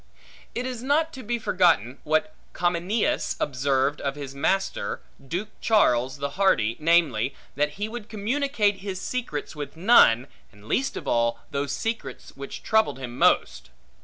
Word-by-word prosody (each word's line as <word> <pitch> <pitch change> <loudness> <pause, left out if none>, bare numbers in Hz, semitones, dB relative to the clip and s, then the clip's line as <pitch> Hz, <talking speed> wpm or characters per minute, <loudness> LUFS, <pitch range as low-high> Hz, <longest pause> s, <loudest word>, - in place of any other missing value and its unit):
It 245 - -2
is 250 -2 -4
not 300 +5 +1
to 265 - -8
be 240 +1 -2
forgotten, 170 - +2
what 155 +7 +1 0.2
Comineus 180 - 0
observeth 135 +1 0
of 140 0 -2
his 140 -2 -7
first - - -14
master, 195 +7 -1 0.3
Duke 185 +8 -3
Charles 130 - +3
the 140 0 -3
Hardy, 115 - +3
namely, 150 -7 +2 0.2
that 150 +1 0
he 205 +6 -3
would 225 -1 -8
communicate 220 -1 0
his 190 -1 -5
secrets 190 - -4
with 145 +1 -7
none; 165 - +6 0.3
and 105 0 -18
least 270 - 0
of - - -7
all, 115 0 +1
those 140 0 -2
secrets 225 - -4
which 140 0 -8
troubled 220 -9 +2
him 125 -2 -7
most. - - +2
170 Hz, 155 wpm, -25 LUFS, 135-220 Hz, 0.3 s, none